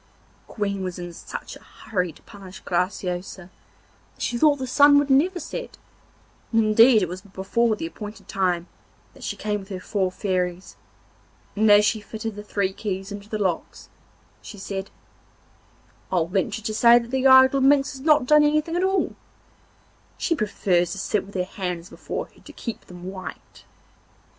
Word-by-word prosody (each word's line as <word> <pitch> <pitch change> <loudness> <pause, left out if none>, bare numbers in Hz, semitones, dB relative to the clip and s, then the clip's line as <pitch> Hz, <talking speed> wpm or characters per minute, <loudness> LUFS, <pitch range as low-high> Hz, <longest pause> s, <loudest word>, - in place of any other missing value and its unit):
The - - -14
wicked - - -15
Queen 200 -2 -1
was 185 -1 -4
in 175 -1 -7
such - - -8
a - - -13
hurry 180 -4 -3
to - - -20
punish 190 -2 -12
Graciosa 180 0 -3 0.6
that - - -16
she - - -1
thought 295 +4 +4
the 265 -2 -5
sun 285 +3 +6
would 285 -1 +2
never 350 +7 +3
set; - - -7 0.7
and 225 -1 +3
indeed 220 +1 +6
it - - 0
was 180 +2 -7
before 205 +3 0
the 325 - -5
appointed 215 -10 -9
time 180 -3 0 0.5
that - - -17
she - - -3
came 210 -1 -2
with 195 0 -12
her 190 -2 -5
four 190 0 -1
Fairies, 180 -2 -2 0.8
and 215 +1 +3
as 205 0 +7
she 215 0 +1
fitted 220 +1 -6
the 210 - -7
three 200 -2 -1
keys 195 -1 -4
into 205 0 -8
the 215 - -2
locks 185 -5 -3 0.5
she 210 - -10
said: 195 0 -5 1.2
'I'll 175 -3 +2
venture 195 +4 -2
to 215 - -3
say 235 +2 +6
that 235 0 -3
the 265 0 +2
idle 260 +1 +7
minx 275 +1 +4
has 265 -2 -10
not 300 -2 +4
done 300 +3 +6
anything 305 +2 +1
at 355 - +1
all—she 380 -2 -4
prefers 180 - 0
to - - -7
sit 200 0 -1
with 200 - -14
her 180 - +1
hands 180 -2 -5
before - - -5
her - - -21
to - - -13
keep 230 - -7
them 180 -1 -12
white. 185 0 -9
205 Hz, 175 wpm, -24 LUFS, 185-255 Hz, 1.2 s, as